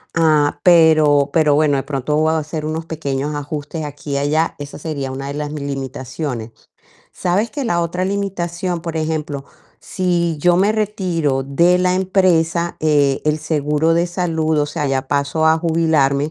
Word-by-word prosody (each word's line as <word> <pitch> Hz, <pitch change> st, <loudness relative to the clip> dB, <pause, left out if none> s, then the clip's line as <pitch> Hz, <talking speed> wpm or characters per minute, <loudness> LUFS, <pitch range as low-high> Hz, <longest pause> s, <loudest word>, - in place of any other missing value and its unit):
ah, 155 Hz, -3 st, +2 dB
pero 155 Hz, -5 st, +5 dB
pero 155 Hz, -2 st, +3 dB
bueno, 145 Hz, -2 st, +3 dB
de 135 Hz, -, -2 dB
pronto 140 Hz, 0 st, -2 dB
voy 155 Hz, +1 st, +2 dB
a -, -, +1 dB
hacer 155 Hz, 0 st, -5 dB
unos 160 Hz, +1 st, -3 dB
pequeños 145 Hz, -3 st, -3 dB
ajustes 150 Hz, +2 st, -5 dB
aquí 145 Hz, 0 st, -8 dB
y 140 Hz, -, +1 dB
allá, 150 Hz, +3 st, 0 dB
esa 145 Hz, 0 st, -8 dB
sería 145 Hz, -4 st, -4 dB
una 135 Hz, +1 st, -5 dB
de 140 Hz, -, -4 dB
las 150 Hz, 0 st, -4 dB
mi 150 Hz, -1 st, -5 dB
limitaciones. 135 Hz, -3 st, -5 dB, 0.6 s
Sabes 195 Hz, +6 st, 0 dB
que 285 Hz, -2 st, -4 dB
la 175 Hz, -7 st, +1 dB
otra 170 Hz, +2 st, -2 dB
limitación, 180 Hz, -3 st, -2 dB
por 165 Hz, -2 st, -4 dB
ejemplo, 155 Hz, -3 st, -3 dB, 0.4 s
si 175 Hz, -3 st, -1 dB
yo 175 Hz, +3 st, +3 dB
me 200 Hz, +4 st, +3 dB
retiro 180 Hz, -10 st, -1 dB
de 170 Hz, +7 st, +3 dB
la 180 Hz, 0 st, +2 dB
empresa, 175 Hz, -3 st, +1 dB
eh, 145 Hz, -3 st, +2 dB
el 150 Hz, 0 st, +1 dB
seguro 150 Hz, +1 st, 0 dB
de 170 Hz, +1 st, +2 dB
salud, 165 Hz, -3 st, -1 dB
o 145 Hz, -, +1 dB
sea, 150 Hz, 0 st, -3 dB
ya 135 Hz, -1 st, -1 dB
paso 145 Hz, +3 st, 0 dB
a 160 Hz, 0 st, +5 dB
jubilarme 160 Hz, -4 st, +1 dB
155 Hz, 175 wpm, -18 LUFS, 145-170 Hz, 0.6 s, pero